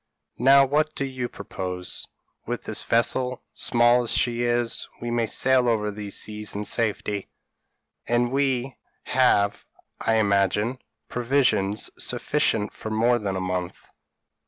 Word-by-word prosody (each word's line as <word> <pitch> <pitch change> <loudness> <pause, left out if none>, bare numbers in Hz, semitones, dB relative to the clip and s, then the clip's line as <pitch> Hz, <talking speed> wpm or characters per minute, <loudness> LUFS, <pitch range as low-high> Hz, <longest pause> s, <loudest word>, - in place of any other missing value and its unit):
Now 135 +2 +7
what 150 +3 0
do 140 - -1
you 130 -2 -4
propose? 90 -1 -5 0.4
With - - -3
this - - -3
vessel, 125 +2 +1
small 120 0 +3
as 120 - -3
she 120 -1 +1
is, 120 -1 0
we 120 0 -4
may 120 -1 +1
sail 130 +2 +2
over 105 -3 +1
these 105 -1 -5
seas 105 -1 -4
in 105 - -2
safety, 105 -2 -2 0.8
and 120 0 +1
we 135 -1 0 0.3
have, 105 -6 +2 0.4
I 115 - +1
imagine, 105 +3 +2 0.3
provisions 120 -5 +1
sufficient 115 -8 0
for 110 - -7
more 115 +3 +2
than 100 -3 -3
a - - -1
month." 90 -1 -4
120 Hz, 135 wpm, -25 LUFS, 105-125 Hz, 0.8 s, Now